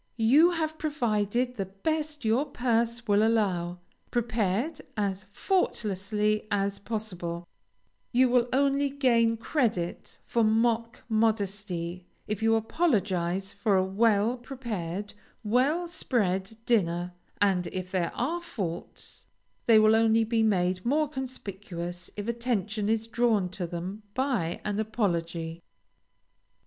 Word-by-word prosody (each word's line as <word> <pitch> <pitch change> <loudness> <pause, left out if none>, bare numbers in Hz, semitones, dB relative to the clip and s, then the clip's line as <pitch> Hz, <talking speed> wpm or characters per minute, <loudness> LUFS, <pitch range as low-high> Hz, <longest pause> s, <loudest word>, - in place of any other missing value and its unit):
You 270 +10 +6
have 315 -2 -2
provided 245 -4 0
the 195 -2 -2
best 300 +8 -3
your 240 +7 +2
purse 235 0 0
will 205 0 +4
allow, 190 -6 +1 0.3
prepared 235 - 0 0.2
as 195 -2 -1
faultlessly 210 - 0
as 200 -1 0
possible; 180 -6 -4 0.7
you 255 +1 +5
will 245 -1 +3
only 280 +1 +2
gain 235 -5 +3
credit 220 - -1
for 235 - +1
mock 230 +1 +1
modesty 200 -6 -1 0.2
if 210 -1 -3
you 225 0 +4
apologize 195 - 0
for 200 0 +2
a 185 - +3
well 215 +4 +2
prepared, 210 -7 -5 0.3
well 270 +11 +2
spread 210 - -1
dinner, 175 -6 +1 0.3
and 190 -3 +2
if 185 0 -5
there 180 -3 0
are 330 +8 -1
faults 180 - -6 0.4
they 225 -2 +7
will 215 0 +6
only 225 0 +4
be 225 0 +1
made 185 -4 +1
more 300 +5 +2
conspicuous 190 - -6
if 205 +1 -4
attention 220 -3 -1
is 225 0 +1
drawn 225 -4 +1
to 180 -1 -4
them 180 +5 -5
by 245 -11 0
an 210 0 -1
apology. 170 -6 -2
215 Hz, 120 wpm, -28 LUFS, 190-240 Hz, 0.7 s, they